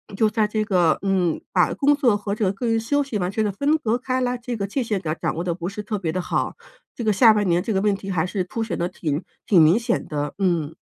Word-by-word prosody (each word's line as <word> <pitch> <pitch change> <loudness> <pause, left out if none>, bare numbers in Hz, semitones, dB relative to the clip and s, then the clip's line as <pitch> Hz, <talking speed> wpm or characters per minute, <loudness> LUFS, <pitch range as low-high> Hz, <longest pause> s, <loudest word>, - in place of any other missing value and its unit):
就 215 +1 +3
在 215 0 +1
这 215 0 -1
个 180 -6 +2
嗯， 185 -4 +1
把 180 -3 +2
工 285 +1 +3
作 255 -7 +3
和 200 0 -4
这 215 0 -1
个 190 - +1
个 220 +5 -5
人 225 0 +2
休 285 +6 +1
息 260 -6 -3
完 180 -1 -1
全 220 +1 0
地 205 - 0
分 285 +10 +1
隔 235 -6 0
开 255 +1 -2
来 250 0 0
这 240 0 -5
个 200 -3 -2
界 255 +7 -2
限 210 -4 -2
感 155 -2 -2
掌 - - -1
握 170 - -3
得 175 -2 -1
不 175 0 -5
是 210 +1 -6
特 210 0 -3
别 165 -4 -2
的 185 - -1
好， - - -1 0.4
这 235 - -5
个 215 - +2
下 220 +2 +6
半 210 -1 +1
年 175 0 +2
这 220 +3 -2
个 190 - +1
问 205 -1 +2
题 195 0 -8
还 170 -3 0
是 185 0 -2
凸 225 +5 -3
显 225 - -3
得 175 - 0
挺 155 -4 -3 0.2
挺 185 -5 +5
明 160 +5 +6
显 235 0 -1
的， 145 -1 -3
嗯。 165 -5 0
200 Hz, 310 characters per minute, -23 LUFS, 180-230 Hz, 0.4 s, 下